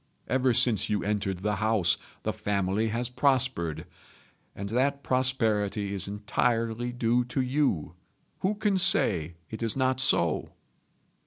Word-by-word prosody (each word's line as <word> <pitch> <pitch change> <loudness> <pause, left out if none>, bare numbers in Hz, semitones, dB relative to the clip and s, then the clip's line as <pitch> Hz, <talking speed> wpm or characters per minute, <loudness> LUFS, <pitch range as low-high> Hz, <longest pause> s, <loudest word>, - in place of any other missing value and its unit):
Ever 130 0 +2
since 115 -3 +3
you 105 -1 0
entered 100 -3 -2
the 105 -1 0
house 110 -4 +3 0.3
the - - -1
family 100 +2 -1
has 115 +2 -1
prospered; 125 - 0 0.7
and 100 - -5
that 140 +5 0
prosperity 110 -6 0
is 100 -1 -1
entirely 115 +3 -1
due 120 0 +1
to 125 - -4
you. 130 - 0 0.5
Who 195 +3 0
can 205 -2 +1
say 95 - +3 0.2
it 110 - -6
is 115 -1 -1
not 130 -1 +1
so?" 85 -11 +1
115 Hz, 135 wpm, -27 LUFS, 100-130 Hz, 0.7 s, since